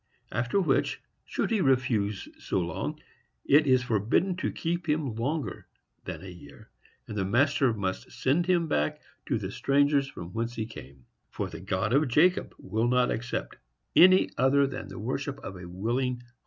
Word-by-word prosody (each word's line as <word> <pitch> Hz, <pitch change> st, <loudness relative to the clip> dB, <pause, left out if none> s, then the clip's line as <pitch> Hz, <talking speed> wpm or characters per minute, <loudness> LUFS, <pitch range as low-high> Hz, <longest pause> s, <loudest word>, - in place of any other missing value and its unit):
After 125 Hz, +10 st, 0 dB
which, 185 Hz, -, +1 dB, 0.3 s
should -, -, -2 dB
he 220 Hz, -3 st, +2 dB
refuse 115 Hz, -, +1 dB
so -, -, -1 dB
long, 85 Hz, -2 st, -3 dB, 0.5 s
it 145 Hz, +1 st, +5 dB
is 130 Hz, -1 st, +4 dB
forbidden 120 Hz, -, +1 dB
to -, -, -1 dB
keep 170 Hz, 0 st, -3 dB
him 150 Hz, -5 st, 0 dB
longer 135 Hz, +7 st, -3 dB, 0.4 s
than -, -, -6 dB
a -, -, -8 dB
year. 85 Hz, -6 st, -13 dB, 0.4 s
And 105 Hz, -, -6 dB
the 100 Hz, -, 0 dB
master 130 Hz, +5 st, +3 dB
must 95 Hz, -4 st, -3 dB
send 160 Hz, +7 st, +1 dB
him 175 Hz, -3 st, +2 dB
back 75 Hz, -, 0 dB, 0.3 s
to -, -, +1 dB
the -, -, -5 dB
strangers 140 Hz, 0 st, +2 dB
from 85 Hz, -9 st, -9 dB
whence 115 Hz, +1 st, -2 dB
he 110 Hz, -, -2 dB
came. 65 Hz, -, -12 dB, 0.2 s
For -, -, -4 dB
the -, -, -7 dB
God 95 Hz, +4 st, -1 dB
of 145 Hz, +2 st, +4 dB
Jacob 165 Hz, +9 st, +3 dB
will 110 Hz, +2 st, -1 dB
not 125 Hz, 0 st, +3 dB
accept 120 Hz, +2 st, -3 dB, 0.4 s
any 185 Hz, +1 st, +7 dB
other 135 Hz, +2 st, +4 dB
than 135 Hz, -1 st, -5 dB
the -, -, -9 dB
worship 135 Hz, +6 st, -3 dB
of 95 Hz, -, -7 dB
a 90 Hz, -1 st, -9 dB
willing 120 Hz, +7 st, -1 dB
heart. 120 Hz, 0 st, -22 dB
125 Hz, 175 wpm, -28 LUFS, 105-145 Hz, 0.5 s, any